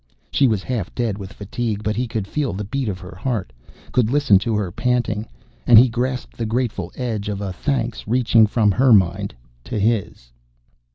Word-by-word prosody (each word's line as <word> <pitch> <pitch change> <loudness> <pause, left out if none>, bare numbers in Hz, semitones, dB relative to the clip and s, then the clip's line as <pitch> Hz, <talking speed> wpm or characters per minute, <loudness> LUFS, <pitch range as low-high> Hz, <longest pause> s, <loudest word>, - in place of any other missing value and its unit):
She 140 - +4
was 105 -5 0
half 115 -8 -3
dead 115 -5 -1
with 95 -1 -8
fatigue, 110 0 -4
but 105 0 -1
he 125 +1 -1
could 110 -3 -3
feel 140 +6 -2
the 100 +3 -4
beat 125 +3 -2
of 95 - -3
her 90 -2 -10
heart, 105 - -3 0.4
could 120 -3 +2
listen 140 -8 +4
to 110 +2 -1
her 100 -4 -1
panting, 115 -1 -1 0.4
and 120 - +8
he 125 +3 +7
grasped 125 +2 -3
the 115 - -2
grateful 110 -6 -2
edge 110 -5 -3
of 100 -1 -3
a 100 -2 -4
thanks 120 0 -2
reaching 115 -2 +4
from 105 -1 +2
her 125 +4 +4
mind 95 -2 +2 0.3
to - - -4
his. 100 - -1
110 Hz, 190 wpm, -21 LUFS, 100-125 Hz, 0.4 s, and